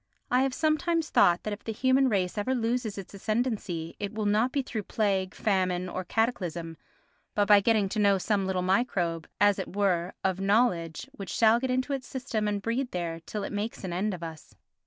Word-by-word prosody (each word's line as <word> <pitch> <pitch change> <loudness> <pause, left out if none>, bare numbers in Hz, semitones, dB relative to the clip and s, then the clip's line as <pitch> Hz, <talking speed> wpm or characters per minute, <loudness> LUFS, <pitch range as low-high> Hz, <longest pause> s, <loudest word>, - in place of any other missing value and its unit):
I 250 +1 +4
have 270 -1 +1
sometimes 320 +1 +1
thought 175 0 +4
that 215 - -2
if 205 - -8
the 225 - -3
human 260 +4 +3
race 185 -5 0
ever 220 +5 0
loses 230 -2 -1
its 195 0 -8
ascendancy 200 -6 -2
it 200 -1 -3
will 215 -1 -3
not 215 +5 +2
be 275 0 0
through 225 -4 -4
plague, 195 -4 0
famine 185 -3 0
or 185 +1 -4
cataclysm, 175 -6 -1 0.6
but 205 -1 +2
by 205 -1 +8
getting 210 -1 +2
to 215 - -2
know 200 -1 +4
some 195 0 0
little 185 -1 0
microbe, 180 -5 0
as 205 0 +4
it - - -6
were, 185 -4 +1
of 190 -1 0
knowledge 195 -2 +1
which 195 -9 -8
shall 225 +5 +4
get 260 +1 -2
into 255 +2 0
its 265 -2 -4
system 240 -5 -2
and 205 -1 -2
breed 245 +3 -1
there 170 -4 -3
till 210 -2 -4
it - - -5
makes 205 +2 -4
an 180 -2 -3
end 195 +3 -1
of 170 - -10
us. 160 -2 -9
205 Hz, 205 wpm, -28 LUFS, 185-235 Hz, 0.6 s, by